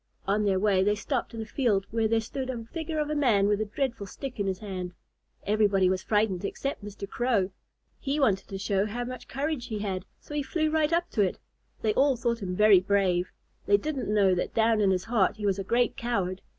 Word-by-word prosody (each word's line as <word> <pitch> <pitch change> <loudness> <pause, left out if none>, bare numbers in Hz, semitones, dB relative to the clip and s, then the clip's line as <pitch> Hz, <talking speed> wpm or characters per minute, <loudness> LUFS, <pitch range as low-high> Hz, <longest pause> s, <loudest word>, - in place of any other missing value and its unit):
On 205 +2 +2
their 195 -2 +2
way 195 -1 +3
they 205 +2 +2
stopped 230 +3 -3
in 225 - -4
a - - -9
field 215 -5 +1
where 225 0 +1
there 225 +1 +2
stood 260 +3 -5
a 235 -3 -4
figure 320 -1 -3
of 300 0 -1
a - - 0
man 225 -9 +3
with 205 0 +1
a - - 0
dreadful 225 -1 -3
stick 255 +4 -7
in 200 - 0
his 190 -1 -1
hand. 185 -3 -6 0.5
Everybody 200 -3 +3
was 185 0 -1
frightened 210 -4 +1
except 275 +3 -3
Mr. 200 -1 -7
Crow. 215 -4 0 0.5
He 285 +2 -1
wanted 205 -8 +2
to 195 - -5
show 195 +1 0
how 240 +3 -3
much 255 0 -7
courage 285 -2 -3
he 215 - -3
had, 195 -3 -3
so - - -11
he 295 - 0
flew 310 +3 -1
right 310 0 +2
up 340 +1 0
to 210 - +1
it. 190 -3 +1 0.5
They 215 -1 +2
all 275 +2 +3
thought 235 -1 -1
him 180 -2 -3
very 210 -1 +7
brave. 185 -2 +1 0.4
They 405 - +6
didn't 300 - -3
know 200 -3 +4
that 180 - -2
down 225 -1 +3
in 200 - +4
his 185 -1 +1
heart 225 -5 +2
he 210 - -4
was 200 -1 +1
a - - -2
great 240 +5 +1
coward. 195 -6 -2
215 Hz, 230 wpm, -28 LUFS, 195-255 Hz, 0.5 s, very